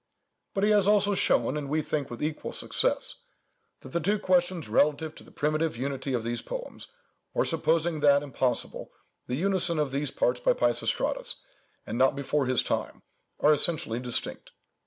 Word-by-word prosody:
But 195 - 0
he 210 - +4
has 205 -2 +4
also 205 -1 +4
shown, 190 - +2
and 145 -2 -4
we 155 +1 0
think 145 -2 -2
with 120 - -6
equal 155 0 -3
success, - - 0 0.6
that - - -11
the 170 - -1
two 205 +6 +1
questions 180 - +1
relative 150 +7 +2
to - - -13
the - - -17
primitive 155 -1 -1
unity 135 +1 -3
of 115 - -2
these 120 +1 -3
poems, - - -7 0.5
or, - - +2
supposing 165 0 +1
that 145 -1 +4
impossible, 130 -3 -2 0.4
the 125 - -2
unison 180 0 +1
of 150 -3 0
these 140 +1 -1
parts 125 0 0
by 125 - +3
Peisistratus, 120 -1 0 0.4
and 115 +3 -4
not 130 +1 +4
before 140 0 -1
his 130 -1 +2
time, - - -3 0.4
are 150 - +6
essentially 150 -7 +1
distinct. 125 -1 -4
150 Hz, 170 wpm, -28 LUFS, 130-170 Hz, 0.6 s, are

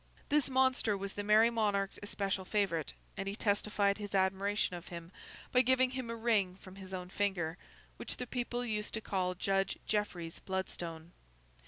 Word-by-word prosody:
This 295 -1 +3
monster 260 -5 +3
was 195 0 -4
the 205 - -3
Merry 215 +3 +6
Monarch's 205 -4 +1
especial 195 -2 -1
favourite, 185 -6 0 0.2
and 195 - -3
he 200 - -2
testified 205 -1 +1
his 205 -1 -4
admiration 195 0 +2
of 175 -1 -8
him 170 0 -8 0.4
by 250 - +6
giving 260 0 +4
him 255 -2 -4
a 230 - -2
ring 220 -5 +2
from 190 0 -13
his 190 -1 -9
own 180 -1 -4
finger, 180 -5 0 0.4
which - - -4
the 250 - -3
people 245 0 -2
used 210 -2 -2
to 220 - -2
call 185 -3 0
Judge 195 +1 +1
Jeffreys's 180 -6 -1
Bloodstone. 170 -3 -4
200 Hz, 170 wpm, -34 LUFS, 190-220 Hz, 0.4 s, Merry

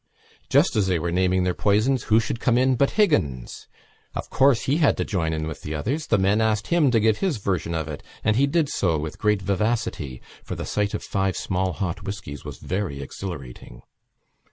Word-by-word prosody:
Just - - +4
as 105 -3 +2
they 90 -2 +2
were 85 +1 -2
naming 90 +1 +2
their 90 0 +1
poisons 110 +7 +2
who 110 +1 +4
should 115 0 -2
come 120 0 +2
in 130 +1 +3
but 140 +3 +3
Higgins! 75 - +1 0.5
Of - - -5
course 135 -3 +4
he 140 +3 +1
had 155 -4 +3
to - - -1
join 85 -5 -1
in 80 -1 -2
with 80 -2 -6
the 75 - -5
others. 135 - -2
The 115 - +3
men 100 +3 +2
asked 110 -1 0
him 170 -5 +4
to 120 -2 +3
give 110 0 +2
his 185 -9 0
version 95 -4 -2
of 80 -2 -2
it, 75 -2 -6 0.2
and 110 - +2
he 135 +4 +3
did 155 +1 +2
so 85 - 0
with 75 +1 -5
great 105 -2 +1
vivacity 100 - -1 0.2
for - - -5
the - - -5
sight 105 -1 -1
of - - -4
five 95 -1 -1
small 95 0 -1
hot 90 -5 -3
whiskies 95 -8 -6
was 75 -4 -8
very 95 -7 -3
exhilarating. 70 -6 -8
100 Hz, 210 wpm, -24 LUFS, 85-115 Hz, 0.5 s, Just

